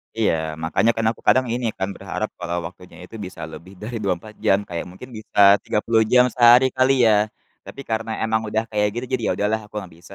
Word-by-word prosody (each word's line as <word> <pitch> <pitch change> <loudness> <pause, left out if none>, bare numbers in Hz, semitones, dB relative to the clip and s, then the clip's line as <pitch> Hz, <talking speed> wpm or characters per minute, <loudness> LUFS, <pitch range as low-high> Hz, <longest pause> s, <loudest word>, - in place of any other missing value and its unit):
Iya, 110 -5 +2 0.3
makanya 110 +8 +2
kan 115 - -1
aku - - -13
kadang 130 0 +5
ini 120 0 -2
kan 95 - -2
berharap 105 +2 -4
kalau 85 0 -3
waktunya 90 -1 -15
itu 100 - -12
bisa 90 -3 -10
lebih 95 +4 -11
dari 115 +2 -5
24 100 +3 -3
jam 95 +1 +4
kayak 85 0 -4
mungkin 125 +8 -12
bisa 110 - -5 0.2
30 110 +1 +1
jam 125 0 +7
sehari 120 +1 +6
kali 130 +1 +4
ya, 105 0 +3 0.4
tapi 140 - -9
karena 110 0 -2
emang 110 0 +1
udah 110 +1 -1
kayak 105 0 +1
gitu, 120 - -3
jadi 130 - 0
ya - - +1
udahlah 105 +2 0
aku 105 - -34
nggak 90 -4 -11
bisa. 85 - -15
110 Hz, 215 wpm, -22 LUFS, 95-115 Hz, 0.4 s, jam